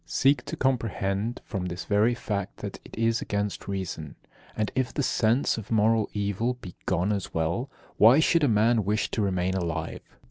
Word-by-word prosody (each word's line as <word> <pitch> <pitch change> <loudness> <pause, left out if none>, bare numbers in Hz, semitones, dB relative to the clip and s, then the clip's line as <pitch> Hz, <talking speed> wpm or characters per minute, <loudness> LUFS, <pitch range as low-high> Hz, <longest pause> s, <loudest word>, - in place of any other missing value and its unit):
Seek 140 +2 +3
to - - -5
comprehend 115 -3 -1
from 95 -5 -3
this 90 0 -5
very 105 +4 +3
fact 105 -5 -4
that - - -6
it - - -12
is 115 0 +1
against 100 0 -3
reason. 95 -6 -4 0.4
And 110 -1 0
if 130 -1 0
the 145 - -1
sense 115 0 +2
of 110 - -10
moral 110 0 +3
evil 105 +4 -1
be 110 -8 -10
gone 95 +2 +1
as 100 -3 -3
well, 85 - -1 0.3
why 120 +7 +7
should 165 0 +3
a - - +5
man 110 0 +3
wish 105 +2 0
to 110 - -1
remain 95 -2 0
alive? 85 -4 -3
105 Hz, 180 wpm, -27 LUFS, 95-120 Hz, 0.4 s, why